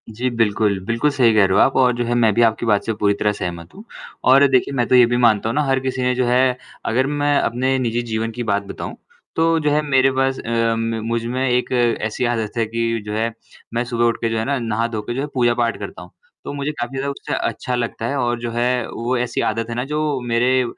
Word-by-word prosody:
जी 120 +4 -2
बिल्कुल, 105 -4 +1
बिल्कुल 115 +7 +1
सही 125 -5 +3
कह 105 -2 +5
रहे 95 - +1
हो - - +3
आप 135 - +1
और 125 -2 +4
जो 120 - -1
है 120 - -1
मैं 115 -3 +3
भी 120 - +2
आपकी 115 0 +2
बात 105 -3 +2
से 115 - -1
पूरी 105 -1 +1
तरह 105 +1 0
सहमत 85 -4 -6
हूँ। 205 - -11 0.5
और 140 +2 +7
देखिए 130 +1 +2
मैं 120 -2 +1
तो - - +3
ये 125 -1 +8
भी 120 +1 0
मानता 110 -3 +3
हूँ 115 - -2
ना 150 - +2
हर 135 -1 +1
किसी 130 0 -3
ने 125 0 +2
जो 125 0 +1
है 125 +1 +2 0.3
अगर 130 +4 +1
मैं 145 0 +2
अपने 130 +3 0
निजी 120 -1 -1
जीवन 115 -1 -2
की 120 +1 -5
बात 100 -2 0
बताऊँ, - - -6 0.4
तो 165 0 +2
जो 150 -1 +1
है 150 +1 +2
मेरे 135 -2 +3
पास 135 0 0
अ, 115 0 0
म 115 0 -2
मुझमें 120 +3 -1
एक 125 0 0 0.3
ऐसी 110 +3 -2
आदत 115 -3 -1
है 115 - +2
कि 115 0 -2
जो 105 - -4
है 115 +2 -1 0.4
मैं 120 +1 0
सुबह 120 -1 0
उठके 115 0 0
जो 115 - -1
है 110 - -1
ना 140 0 0
नहा-धोके 115 0 -2
जो 135 - -1
है 145 - -3
पूजा-पाठ 120 -2 +1
करता - - -7
हूँ। - - -13 0.3
तो - - -6
मुझे 145 +1 -2
काफ़ी 135 -2 -5
ज़्यादा 140 +1 -2
उससे 140 - -6
अच्छा 125 - -3
लगता 115 -2 -3
है 140 - -2
और 120 -2 0
जो 120 0 -4
है 120 +1 0
वो 120 +2 -2
ऐसी 120 0 -1
आदत 115 +1 -3
है 115 - -4
ना 120 - -1
जो 150 +2 -3 0.3
मेरे 125 +2 +2
120 Hz, 250 wpm, -20 LUFS, 115-130 Hz, 0.5 s, ये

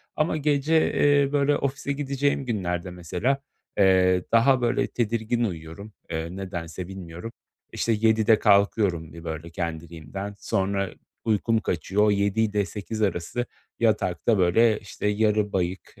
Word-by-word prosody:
ama 155 0 +1
gece, 150 +2 +2
eee, 145 -1 +3
böyle, 145 0 +2
ofise 140 0 -2
gideceğim 140 0 -1
günlerde 90 -6 -2
mesela, 90 +10 -1 0.4
eee, 95 -2 +4
daha 125 +3 +4
böyle 125 +3 +1
tedirgin 115 0 -1
uyuyorum, 90 +2 -6 0.2
eee, 80 +2 -4
nedense 90 -2 -6
bilmiyorum. 95 +2 -8 0.4
İşte 115 - 0
7.00'de 110 0 +3
kalkıyorum 100 -5 +2
bir 85 0 -10
böyle 80 0 -5
kendiliğimden. 85 +4 -6
Sonra 100 0 -1 0.4
uykum 110 +1 +2
kaçıyor, 95 +1 0
o, 105 - +4
7.00 100 +2 +1
ile 105 -2 +1
8.00 105 +2 -6
arası 100 +4 -1 0.3
yatakta, 110 -1 +1
böyle, 105 +5 +4
işte, 105 0 -5
yarı 105 0 +1
bayık, 90 0 -2
105 Hz, 130 wpm, -25 LUFS, 90-115 Hz, 0.4 s, eee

